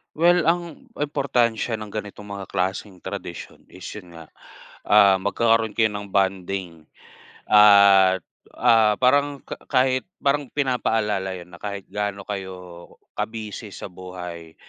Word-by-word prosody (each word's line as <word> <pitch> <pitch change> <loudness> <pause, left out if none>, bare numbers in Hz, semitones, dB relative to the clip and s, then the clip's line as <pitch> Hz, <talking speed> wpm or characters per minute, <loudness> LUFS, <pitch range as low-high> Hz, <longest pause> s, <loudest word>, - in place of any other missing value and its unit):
Well, 175 +1 +3
ang 170 -1 -1
importansya 125 -6 0
ng 110 -1 -8
ganitong 105 -1 -7
mga 100 -1 -6
klaseng 95 0 -3
tradisyon - - -8
is, 95 - -14
'yon 90 -5 -11
nga, 80 -1 -11 0.6
ah, 100 -2 +6
magkakaroon 115 +2 +1
kayo 110 -1 +2
ng 100 -1 -6
bonding 95 -4 -2 0.6
at, 100 -3 +6 0.3
ah, 110 -2 +4
parang 140 +2 +2
ka - - -5
kahit 130 -1 +2 0.2
parang 140 -1 0
pinapaalala 110 -8 0
'yon 90 -1 -11
na 85 - -12
kahit 100 -2 -6
gaano 100 -1 -4
kayo 90 -3 -7 0.3
ka-busy 110 -1 -5
sa - - -8
buhay 90 -3 -9
105 Hz, 125 wpm, -23 LUFS, 95-115 Hz, 0.6 s, ah